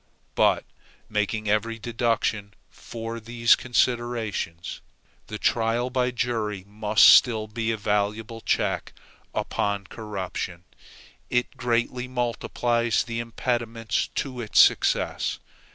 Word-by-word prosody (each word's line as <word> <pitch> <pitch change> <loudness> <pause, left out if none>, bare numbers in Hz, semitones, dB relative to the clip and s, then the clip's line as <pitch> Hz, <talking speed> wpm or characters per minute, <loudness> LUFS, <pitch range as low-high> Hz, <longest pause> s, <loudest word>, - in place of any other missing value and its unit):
But - - +3 0.4
making 105 0 -1
every 110 +2 0
deduction 115 -3 -1 0.2
for 115 0 -7
these 115 +1 +3
considerations, 120 -9 -1 0.5
the 105 - -5
trial 115 +3 +1
by 125 -1 +1
jury 115 -5 -2
must 105 +1 +4
still 110 -4 +6
be 115 +1 -2
a 110 - -2
valuable 105 +2 -1
check - - -1 0.4
upon 100 -1 -1
corruption. 95 -4 -5 0.7
It 125 0 0
greatly 120 +1 -1
multiplies 120 -1 0
the 115 0 -4
impediments 115 -1 -2
to 130 -3 -3
its 110 - +1
success. - - +3
115 Hz, 105 wpm, -25 LUFS, 105-120 Hz, 0.7 s, still